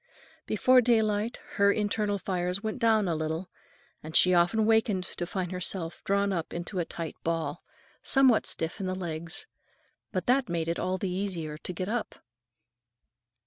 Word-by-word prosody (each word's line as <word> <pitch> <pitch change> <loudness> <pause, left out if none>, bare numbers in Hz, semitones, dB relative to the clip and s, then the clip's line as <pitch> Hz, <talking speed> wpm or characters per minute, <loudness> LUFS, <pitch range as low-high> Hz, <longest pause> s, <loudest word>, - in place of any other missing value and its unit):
Before 255 0 +5
daylight, 220 -1 +1 0.2
her 200 -1 +5
internal 205 -1 0
fires 180 0 -2
went 220 +3 -3
down 220 -4 +3
a 170 - +1
little, 160 +3 -3 0.5
and 155 +1 -8
she 185 - +6
often 180 +6 +3
wakened 220 -4 +3
to 175 -1 -4
find 180 -1 -3
herself 180 -2 -2
drawn 200 0 +2
up 170 -3 -3
into 175 +2 -4
a 170 - 0
tight 165 -2 -6
ball, 165 -1 -2 0.4
somewhat 265 -4 +4
stiff 165 +6 0
in 190 - -2
the 185 - -1
legs. 165 - -5 0.7
But 185 -2 -2
that 255 -1 +2
made 165 -1 -1
it 170 - -1
all 185 0 -1
the 185 0 -2
easier 180 -5 -3
to - - -6
get 180 +1 -4
up. 230 +2 -2
185 Hz, 165 wpm, -28 LUFS, 170-215 Hz, 0.7 s, she